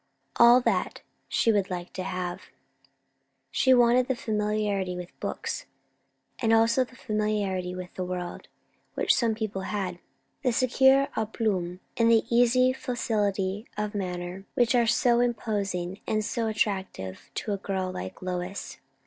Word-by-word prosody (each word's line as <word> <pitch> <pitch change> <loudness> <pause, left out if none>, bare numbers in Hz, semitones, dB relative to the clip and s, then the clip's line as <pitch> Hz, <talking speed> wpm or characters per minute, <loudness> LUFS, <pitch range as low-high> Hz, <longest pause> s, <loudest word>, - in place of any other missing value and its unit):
All 240 +2 +8
that, - - 0 0.3
she 230 - +3
would 200 -3 +1
like 180 -1 -5
to 185 - -4
have. 185 -1 -4 1.1
She 260 - +3
wanted 245 0 +5
the 260 - 0
familiarity 210 -4 -1
with 180 -1 -7
books, - - -4 0.7
and 225 - +1
also 225 +3 +4
the 255 0 -14
familiarity 210 -6 -1
with 185 0 -7
the 185 - -3
world, 180 -1 -5 0.5
which - - +3
some 230 -3 +1
people 215 -3 -3
had; 190 -3 -3 0.4
the 250 -4 +1
secure 265 +3 +4
à 220 0 -2
plomb 185 -6 -1 0.2
and 230 -1 +4
the 225 -1 +5
easy 255 +2 +4
facility 210 -5 -1
of 210 0 -2
manner 180 -1 -4
which 240 0 +3
are 240 -2 +3
so 235 +1 +3
imposing 200 -6 -1
and 215 -1 0
so 230 0 -1
attractive 190 - -2
to 210 - -2
a - - -1
girl 190 -1 -2
like 95 - -7
Lois. 180 +1 -4
210 Hz, 145 wpm, -27 LUFS, 185-235 Hz, 1.1 s, All